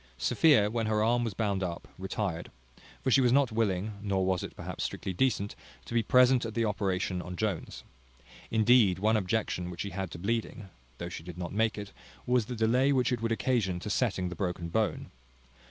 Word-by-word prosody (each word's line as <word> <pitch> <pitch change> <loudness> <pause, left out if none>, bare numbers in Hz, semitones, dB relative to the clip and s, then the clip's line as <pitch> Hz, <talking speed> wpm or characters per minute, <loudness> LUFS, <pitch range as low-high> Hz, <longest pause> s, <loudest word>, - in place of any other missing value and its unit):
Sophia, 105 - +4
when 115 -1 -1
her 110 -1 +2
arm 120 +2 +2
was 110 -5 -3
bound 100 -3 0
up, 85 -2 -4
retired: 95 -2 -3 0.5
for 130 - +1
she 135 - +6
was 125 -2 +3
not 135 -2 +3
willing 105 -2 -1
(nor 95 -2 0
was 95 -1 +1
it, - - -7
perhaps, - - -5
strictly 95 - -3
decent) 105 -2 0 0.3
to - - -8
be 120 - +3
present 125 +1 +5
at 110 -2 -5
the 115 -1 +1
operation 95 -3 -1
on 90 0 -7
Jones. 100 -4 -3 0.7
Indeed, 110 -3 +4
one 110 +4 +2
objection 95 -3 -1
which 85 -1 -6
she 100 - -4
had 95 -1 -4
to - - -8
bleeding 105 +1 -3 0.3
(though 85 - -5
she 90 - -7
did 85 +1 -9
not 90 0 -5
make 110 +1 +1
it) 100 -1 -6 0.3
was 125 -3 +2
the 125 - -4
delay 120 +5 +3
which 130 -3 +2
it 120 -2 -1
would 115 0 -1
occasion 110 -6 0
to 105 - -4
setting 95 -7 0
the 90 - -6
broken 90 -1 -3
bone. 110 +5 -1
105 Hz, 205 wpm, -30 LUFS, 95-115 Hz, 0.7 s, she